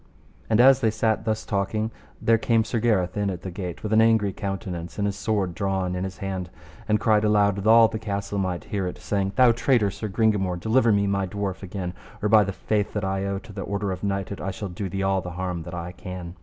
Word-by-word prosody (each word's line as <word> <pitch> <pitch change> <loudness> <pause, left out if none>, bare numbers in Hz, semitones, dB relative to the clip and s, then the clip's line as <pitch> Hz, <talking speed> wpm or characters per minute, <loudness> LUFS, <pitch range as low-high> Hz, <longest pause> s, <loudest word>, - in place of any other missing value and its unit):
And 110 0 +3
as 135 +1 +7
they 115 - +3
sat 110 0 0
thus 110 0 -1
talking, 105 +3 -1 0.3
there 115 0 +3
came 115 0 +2
Sir 110 +1 -2
Gareth 100 -6 +1
in 105 -1 0
at 90 -2 -5
the 95 - -5
gate 90 -2 -6
with 110 0 -1
an 110 - +6
angry 110 -3 +3
countenance, 95 -4 -5
and 100 - 0
his 100 -1 -1
sword 100 -3 -1
drawn 95 -1 -1
in 90 +1 -2
his 95 - -6
hand, 95 -3 -4 0.4
and 105 0 +2
cried 110 -1 +3
aloud 105 -2 +3
that 100 +2 -2
all 115 0 +8
the 110 - -5
castle 100 -1 -3
might 90 -2 -2
hear 100 -3 -2
it, 90 - -5
saying: 100 -1 -2
Thou 125 -2 +6
traitor, 115 -3 +2
Sir 110 - -5
Gringamore, 100 -4 +1
deliver 115 +4 +3
me 100 -1 +3
my 100 -1 0
dwarf 100 0 -4
again, 90 -2 -5 0.3
or 105 - 0
by 110 0 +7
the 100 - -2
faith 105 +2 -1
that 105 -2 -2
I 95 0 -1
owe 100 0 -1
to 105 +1 -11
the 100 - -5
order 100 0 -2
of 95 - -5
knighthood, 100 0 -2
I 95 - -2
shall 100 +1 -5
do 95 +2 -5
thee 95 +2 -2
all 95 0 +1
the 90 - -6
harm 90 -2 -3
that 85 +1 -7
I 85 0 -5
can. 90 -1 -8
100 Hz, 245 wpm, -25 LUFS, 95-110 Hz, 0.4 s, all